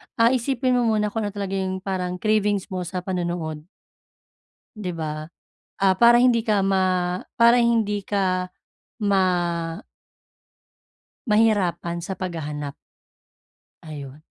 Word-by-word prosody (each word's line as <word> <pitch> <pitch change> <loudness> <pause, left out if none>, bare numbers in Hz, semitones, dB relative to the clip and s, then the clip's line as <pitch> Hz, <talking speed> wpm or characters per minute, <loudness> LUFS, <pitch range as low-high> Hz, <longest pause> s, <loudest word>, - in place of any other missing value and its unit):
ah, 230 0 +4
isipin 260 +1 0
mo 240 - +1
muna 210 -1 0
kung 220 -1 -2
ano 205 - -7
talaga 200 -1 -3
'yong 190 0 -3
parang 180 -2 -2
cravings 205 0 0
mo 185 - -2
sa 180 -1 -4
panonood. 175 -4 -3 1.1
Di 190 -4 -4
ba? 155 -2 -4 0.6
Ah, 190 -1 +5
para 240 0 +7
hindi 240 -2 +4
ka 210 -3 +1
ma 185 -2 +1 0.2
para 235 +1 +6
hindi 220 -3 +1
ka 185 -2 0 0.6
ma 195 -2 +3 2.0
mahirapan 205 -6 +2
sa 190 +2 -4
paghahanap. 150 -6 -5 1.1
Ayun. 145 -1 -9
190 Hz, 115 wpm, -23 LUFS, 180-215 Hz, 2.0 s, para